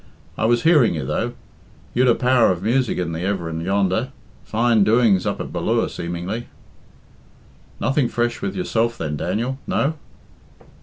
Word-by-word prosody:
I - - -1
was 120 +1 +2
hearing 150 - +4
you, 75 -4 -3
though. - - -2 0.6
You'd 125 +1 +3
a 120 - +5
power 125 -4 +3
of 90 0 -3
music 125 +2 +1
in 90 -2 -2
the 80 +1 -4
everin' 85 -4 -2
yonder. 100 +6 0 0.3
Fine 115 -1 +2
doings 110 -3 +3
up - - -2
at - - -6
Ballure, - - 0
seemingly." 90 +7 -5 1.3
"Nothing 135 +1 +1
fresh 120 +3 -1
with 195 -1 -3
yourself 115 -10 0
then, 75 -2 -3
Daniel? 120 - -2
No?" 145 +3 +1
115 Hz, 150 wpm, -21 LUFS, 90-125 Hz, 1.3 s, a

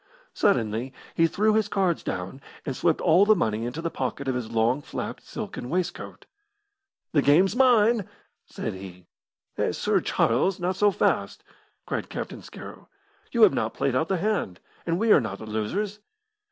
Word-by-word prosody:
Suddenly 120 - 0 0.2
he 165 - +3
threw 215 +5 +2
his 215 -1 +2
cards 190 -5 0
down, 90 +10 -5 0.2
and 135 - -3
swept 165 +2 +1
all 175 +3 +5
the 215 +1 +5
money 110 - -1
into 150 +7 -5
the 165 - -2
pocket 135 +1 -4
of 130 - +1
his 125 -3 -4
long 115 +5 +2
flapped - - -6
silken 125 - -7
waistcoat. 180 +2 -3 0.9
"The 145 - +3
game's 180 - +4
mine!" 235 -5 +4 0.4
said - - -5
he. 95 -2 -10 0.5
"Heh, - - 0
Sir - - +1
Charles, 175 - +1
not 180 +1 -1
so 205 +2 +4
fast!" 200 - 0 0.4
cried - - -3
Captain - - -6
Scarrow; - - -11 0.4
"you 235 -2 +4
have 210 - +7
not - - -2
played 140 -2 0
out 145 +5 +1
the 190 - 0
hand, 180 - -1 0.3
and 165 0 +1
we 220 +3 +2
are 150 - +7
not 100 -4 -4
the 110 - -9
losers." 185 - -3
165 Hz, 170 wpm, -26 LUFS, 120-200 Hz, 0.9 s, have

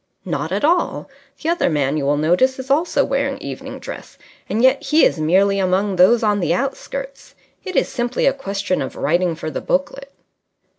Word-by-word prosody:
"Not 160 -2 -3
at 200 +2 -1
all. 345 +3 +1 0.3
The 320 - -2
other 340 - +1
man, 145 -3 0
you 145 -3 -1
will 145 +1 +2
notice, 180 - +2
is 260 0 -6
also 320 +5 +2
wearing - - -1
evening - - -7
dress, - - -9 0.3
and 225 +3 0
yet 260 +1 +4
he 310 +1 +3
is - - +1
merely 195 +5 +2
among 190 +1 +1
those 220 +6 +5
on 210 -1 +2
the 175 -2 +1
outskirts. - - -5 0.3
It 375 -2 -6
is - - +2
simply 240 -1 -2
a 275 - +4
question 200 -8 -2
of 130 - -5
writing 175 +2 0
for 155 - -5
the - - -4
booklet." 275 0 -2
200 Hz, 190 wpm, -20 LUFS, 175-275 Hz, 0.3 s, those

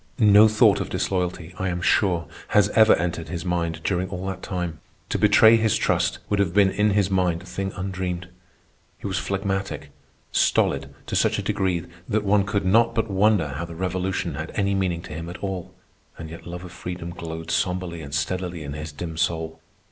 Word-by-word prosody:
No 105 0 +7
thought 110 0 +4
of - - -4
disloyalty, 90 -2 -2
I 95 - 0
am 85 0 -2
sure, 90 -1 +2 0.3
has 105 - +5
ever 110 -1 +6
entered 85 -1 -3
his 85 0 -4
mind 85 -2 -1
during 95 -1 0
all 90 0 -5
that 95 -1 -4
time. 90 -4 -4 0.3
To - - -1
betray 110 +1 +7
his 110 -2 +2
trust - - +1
would 105 - 0
have 95 -3 +1
been 100 -2 +5
in 105 +2 +2
his 100 -1 +2
mind 90 -3 +1
a - - -14
thing 95 0 -4
undreamed. 90 -2 -3 0.7
He - - -12
was 100 -1 -1
phlegmatic, 95 -6 -3 0.4
stolid - - +2
to - - -4
such - - +2
a - - -2
degree 90 -3 0 0.2
that 105 0 +1
one 100 0 +3
could 100 -1 -1
not 115 +4 +4
but 110 -2 0
wonder 95 -5 +3
how 70 +4 -4
the 85 0 -9
Revolution 90 -1 -2
had 80 +3 -5
any 100 -1 +1
meaning 90 -3 -1
to 80 - -8
him 80 +2 -6
at 90 - -7
all. 95 -3 -5 0.5
And 80 -1 -8
yet 85 - -10
love 90 +1 -6
of 90 - -10
freedom 90 -1 -6
glowed 80 -1 -6
sombrely 90 0 -1
and 70 -2 -8
steadily 85 +3 -2
in 70 -1 -6
his 75 +1 -6
dim 80 +2 -6
soul. 80 -1 -1
90 Hz, 200 wpm, -24 LUFS, 85-100 Hz, 0.7 s, No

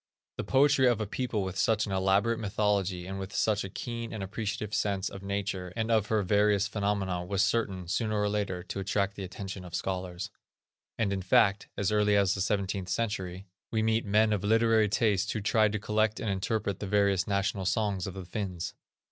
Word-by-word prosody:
The - - -2
poetry 135 -1 +4
of 120 -3 +3
a 110 - -1
people 110 -1 -2
with 95 0 -4
such 110 +2 +2
an 100 - -6
elaborate 95 +4 +2
mythology 100 -4 0
and 95 +1 -5
with 95 +1 -6
such 110 -1 +1
a 95 - -5
keen 115 +3 -5
and 110 -3 -4
appreciative 105 +1 -4
sense 100 -2 0
of 95 - -9
nature 100 -2 -3
and 110 +1 -1
of 110 -2 +3
her 110 -2 +1
various 100 +1 +3
phenomena, 100 -3 -1
was 95 +2 +1
certain, 95 -5 0
sooner 110 +3 0
or 105 - +2
later, 100 -4 -2
to 95 - -5
attract 100 +1 0
the 100 - -6
attention 95 0 -6
of 90 -2 -7
scholars. 95 +1 -3 0.7
And, 100 -3 +1
in 95 - -2
fact, 100 +2 +3
as 100 0 0
early 105 -1 +3
as 100 -2 +3
the 100 - -3
seventeenth 100 -1 -1
century, 95 -5 -2 0.2
we 110 -1 0
meet 110 +1 +2
men 105 +1 +3
of 100 - -1
literary 110 0 +4
tastes 100 -1 +1
who - - -2
tried 105 +1 +3
to 105 - -1
collect 110 +1 +1
and 110 - -1
interpret 100 0 -1
the 105 - -4
various 100 -2 +2
national 100 -1 0
songs 100 -1 0
of 95 - -6
the 95 -2 -6
Finns. 95 -3 -4
100 Hz, 200 wpm, -29 LUFS, 95-110 Hz, 0.7 s, poetry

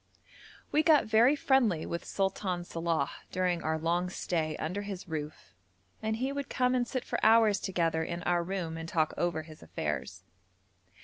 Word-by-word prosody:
We 305 - +4
got 315 -2 +5
very 225 +6 +5
friendly 245 - +2
with 170 - -4
Sultan 190 -2 -1
Salàh 165 -4 -1 0.2
during 180 -2 0
our 160 0 0
long 170 +3 0
stay 160 -4 -2
under 180 +6 -3
his 200 -3 -6
roof, 155 - -6 0.5
and 220 0 -1
he 260 +4 -1
would 280 -1 -4
come 250 0 +2
and 245 -1 +1
sit 255 +1 -3
for - - -3
hours 220 -2 +6
together 165 -3 0
in 170 +1 -4
our 175 -1 +2
room 170 -3 -3
and 165 0 -6
talk 155 -2 +1
over 170 -2 -1
his 155 -1 -13
affairs. - - -4
180 Hz, 170 wpm, -30 LUFS, 165-220 Hz, 0.5 s, hours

